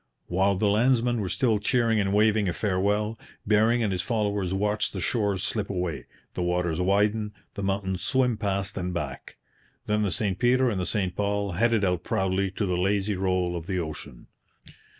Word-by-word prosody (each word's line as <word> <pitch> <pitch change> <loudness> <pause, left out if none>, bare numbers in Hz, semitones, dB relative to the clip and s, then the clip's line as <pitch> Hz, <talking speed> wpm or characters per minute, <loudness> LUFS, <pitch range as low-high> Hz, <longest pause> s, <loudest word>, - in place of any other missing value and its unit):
While 95 +3 +1
the 95 - 0
landsmen 120 +2 +2
were 95 - -2
still 115 -3 +1
cheering 115 +1 +2
and 95 -1 +1
waving 105 -1 +3
a - - -1
farewell, 105 +3 0 0.3
Bering 110 +3 +3
and 105 - 0
his 90 -1 -1
followers 105 -5 -1
watched 105 +2 0
the 95 - -4
shores 100 0 0
slip 105 -3 -2
away, 90 -4 -3 0.3
the - - -3
waters 90 -1 0
widen, 105 +3 +1 0.2
the 100 - -5
mountains 95 -1 -1
swim 130 -3 +1
past 100 -1 -2
and 90 -1 -3
back. 75 -6 -5 0.5
Then 105 0 +1
the 105 - +1
St 95 +1 -1
Peter 125 0 +3
and 95 -3 -2
the 90 - -2
St 95 -3 -1
Paul 100 -1 -1
headed 110 +3 +2
out 90 -2 0
proudly 95 +1 0
to 100 +3 -2
the 90 -2 -1
lazy 100 +2 +1
roll 90 -2 0
of 85 -1 -6
the 95 -2 -1
ocean. 75 -6 -6
100 Hz, 185 wpm, -26 LUFS, 90-105 Hz, 0.5 s, waving